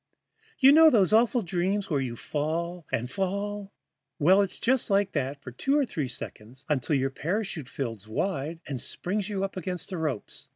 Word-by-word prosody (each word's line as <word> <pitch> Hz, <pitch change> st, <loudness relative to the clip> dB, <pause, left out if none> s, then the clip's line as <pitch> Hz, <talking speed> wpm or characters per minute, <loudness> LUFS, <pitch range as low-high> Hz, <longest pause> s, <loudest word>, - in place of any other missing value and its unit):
You 270 Hz, 0 st, +7 dB
know 320 Hz, +2 st, +8 dB
those 210 Hz, -, +3 dB
awful 235 Hz, +1 st, +4 dB
dreams 190 Hz, +3 st, -1 dB
where 140 Hz, -3 st, +2 dB
you 125 Hz, -3 st, -3 dB
fall 165 Hz, +5 st, -3 dB
and 120 Hz, +2 st, 0 dB
fall? 200 Hz, +5 st, -3 dB, 0.5 s
Well, 185 Hz, +5 st, +5 dB
it's 195 Hz, -2 st, -1 dB
just 255 Hz, 0 st, +2 dB
like 200 Hz, 0 st, +2 dB
that 135 Hz, +2 st, -2 dB
for 130 Hz, -, -7 dB
two 270 Hz, -, +1 dB
or 290 Hz, -, +3 dB
three 150 Hz, -, -3 dB
seconds, 125 Hz, +2 st, -7 dB
until 150 Hz, -1 st, +1 dB
your 135 Hz, 0 st, +1 dB
parachute 165 Hz, -, -3 dB
fills 115 Hz, -6 st, -5 dB
wide 160 Hz, -, -2 dB
and 135 Hz, -4 st, -3 dB
springs 190 Hz, +8 st, -2 dB
you 195 Hz, -2 st, -2 dB
up 195 Hz, -1 st, -4 dB
against 180 Hz, +1 st, -4 dB
the 180 Hz, -, -3 dB
ropes. 150 Hz, -9 st, -4 dB
175 Hz, 180 wpm, -27 LUFS, 140-200 Hz, 0.5 s, know